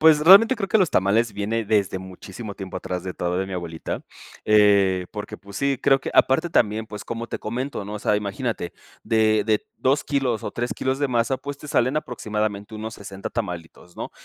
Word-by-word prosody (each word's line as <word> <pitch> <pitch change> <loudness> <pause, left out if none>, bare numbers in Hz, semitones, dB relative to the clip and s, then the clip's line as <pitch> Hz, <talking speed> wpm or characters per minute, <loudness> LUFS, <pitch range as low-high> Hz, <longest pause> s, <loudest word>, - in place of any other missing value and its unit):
Pues 155 -1 +6
realmente 200 +10 +8
creo 195 -5 -3
que 220 - +4
los 185 -5 +3
tamales 110 +5 +2
viene 110 +3 -2
desde 100 -3 +1
muchísimo 95 +3 -9
tiempo 95 -1 -7
atrás 90 -1 -4
de 90 -1 -5
todo 90 +1 -1
de 95 - -1
mi 95 - -7
abuelita, 85 -3 -5 0.4
eh, 100 -3 +4
porque, - - -6
pues, 100 +1 -12
sí, 140 -1 +1
creo 135 -1 +4
que - - -5
aparte 160 +6 +4
también, 110 -4 +2
pues, 105 -2 -8
como 115 0 -5
te - - -5
comento, 125 +1 -4
¿no? 105 +1 -6
O 105 - -4
sea, 105 - +1
imagínate 105 -1 -3 0.3
de 110 -1 +3
de 110 -2 +1
2 135 +3 +2
kilos 135 -6 0
o - - -3
3 120 +1 -2
kilos 130 +1 -1
de 145 - +1
masa, 120 +1 +1
pues, 145 +1 -7
te 150 - -10
salen 140 -2 +1
aproximadamente 110 -6 -3
unos 110 +1 -6
60 100 -1 -7
tamalitos, 90 -5 -6
¿no? - - -5
110 Hz, 205 wpm, -23 LUFS, 100-130 Hz, 0.4 s, realmente